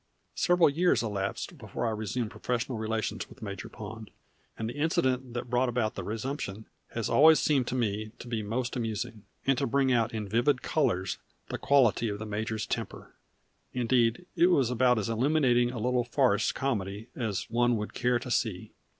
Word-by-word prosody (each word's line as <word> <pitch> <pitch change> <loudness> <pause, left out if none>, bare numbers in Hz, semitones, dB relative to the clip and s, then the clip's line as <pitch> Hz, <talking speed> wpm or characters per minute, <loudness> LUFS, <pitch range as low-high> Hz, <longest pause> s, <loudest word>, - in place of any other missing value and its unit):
Several 175 -1 +4
years 150 -4 +2
elapsed 100 -3 -3
before - - -4
I 115 - +1
resumed 110 +2 -3
professional 120 +1 -2
relations 110 0 -2
with - - -13
Major 100 -3 -6
Pond, 110 0 -8 0.5
and 110 - -3
the 120 - -4
incident 130 -4 0
that 120 - -3
brought 125 +1 +2
about 115 -3 0
that 95 - -5
resumption 110 -1 -4 0.3
has 115 -2 -1
always 160 +2 +7
seemed 135 -5 +2
to 130 - -2
me 110 -3 -1
to - - -10
be 115 -2 -2
most 120 +4 -2
amusing, 110 -2 -3 0.2
and 135 - +4
to - - 0
bring 135 +1 +2
out 115 -1 +2
in 110 -2 -4
vivid 120 +6 +2
colors 115 - 0 0.3
the - - -4
quality 120 -5 +3
of 100 - -3
the 110 - -6
major's 110 0 -2
temper. - - -5 0.6
Indeed 120 +4 +2
it 175 0 +5
was 135 -9 +3
about 125 0 +3
as 105 - -1
illuminating 120 0 +3
a 125 - -6
little 125 +2 +1
farce 120 -3 +2
comedy 110 -4 -3
as 110 -6 -2
one 120 0 +3
would 105 0 -5
care 125 0 +2
to 125 +1 -6
see. 110 -6 -1
120 Hz, 180 wpm, -29 LUFS, 110-130 Hz, 0.6 s, always